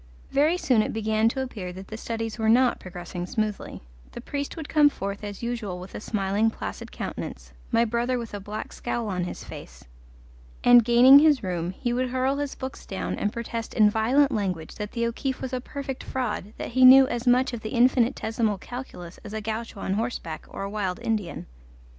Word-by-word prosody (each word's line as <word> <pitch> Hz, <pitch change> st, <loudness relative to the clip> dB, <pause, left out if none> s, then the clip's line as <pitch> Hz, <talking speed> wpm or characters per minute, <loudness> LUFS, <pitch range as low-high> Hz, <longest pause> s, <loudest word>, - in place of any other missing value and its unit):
Very 300 Hz, +5 st, +3 dB
soon 250 Hz, -10 st, +3 dB
it -, -, -2 dB
began 220 Hz, 0 st, +2 dB
to 265 Hz, +2 st, -2 dB
appear 205 Hz, -8 st, -6 dB
that 190 Hz, +1 st, -10 dB
the 220 Hz, -, -6 dB
studies 225 Hz, 0 st, -4 dB
were 220 Hz, 0 st, +2 dB
not 245 Hz, +2 st, +4 dB
progressing 175 Hz, 0 st, -7 dB
smoothly; 215 Hz, -, -3 dB, 0.3 s
the -, -, -7 dB
priest 285 Hz, +2 st, -5 dB
would 315 Hz, -2 st, -6 dB
come 300 Hz, -2 st, +5 dB
forth 200 Hz, -5 st, -5 dB
as 205 Hz, +1 st, -7 dB
usual 230 Hz, -6 st, -3 dB
with 185 Hz, +1 st, -10 dB
a -, -, -5 dB
smiling, 205 Hz, +1 st, +1 dB
placid -, -, -7 dB
countenance, -, -, -6 dB, 0.2 s
my 230 Hz, 0 st, +4 dB
brother 240 Hz, +2 st, 0 dB
with 235 Hz, -3 st, -6 dB
a 205 Hz, -, -4 dB
black 210 Hz, +2 st, -6 dB
scowl 235 Hz, -2 st, -3 dB
on 180 Hz, -2 st, -1 dB
his -, -, -6 dB
face, -, -, -11 dB, 0.8 s
and 245 Hz, -1 st, +8 dB
gaining 245 Hz, +4 st, +8 dB
his 295 Hz, -5 st, +4 dB
room, 175 Hz, -2 st, -2 dB
he 240 Hz, +6 st, -3 dB
would 255 Hz, +1 st, 0 dB
hurl 260 Hz, +2 st, 0 dB
his 285 Hz, -1 st, -3 dB
books 260 Hz, +1 st, -7 dB
down 190 Hz, -, -4 dB
and 205 Hz, -, -1 dB
protest 230 Hz, 0 st, -5 dB
in 210 Hz, -2 st, +5 dB
violent 260 Hz, +7 st, +3 dB
language 185 Hz, -8 st, -2 dB
that 210 Hz, -1 st, -6 dB
the 235 Hz, -1 st, 0 dB
O'Keefe 255 Hz, +3 st, -2 dB
was 260 Hz, 0 st, -5 dB
a 255 Hz, -, -1 dB
perfect 270 Hz, 0 st, -6 dB
fraud, 220 Hz, -5 st, -3 dB
that -, -, -5 dB
he 260 Hz, +2 st, +3 dB
knew 260 Hz, +1 st, +10 dB
as 240 Hz, 0 st, -3 dB
much 250 Hz, +1 st, +4 dB
of 235 Hz, -, -3 dB
the 215 Hz, -, -5 dB
infinitesimal 230 Hz, -3 st, +2 dB
calculus 185 Hz, -7 st, -8 dB
as 210 Hz, -, -8 dB
a 220 Hz, -, -2 dB
gaucho 220 Hz, -1 st, -5 dB
on 190 Hz, -, -1 dB
horseback 205 Hz, -7 st, -3 dB
or 195 Hz, -, -6 dB
a 195 Hz, -, -3 dB
wild 195 Hz, -4 st, -2 dB
Indian. 210 Hz, -6 st, -2 dB
225 Hz, 200 wpm, -26 LUFS, 205-255 Hz, 0.8 s, knew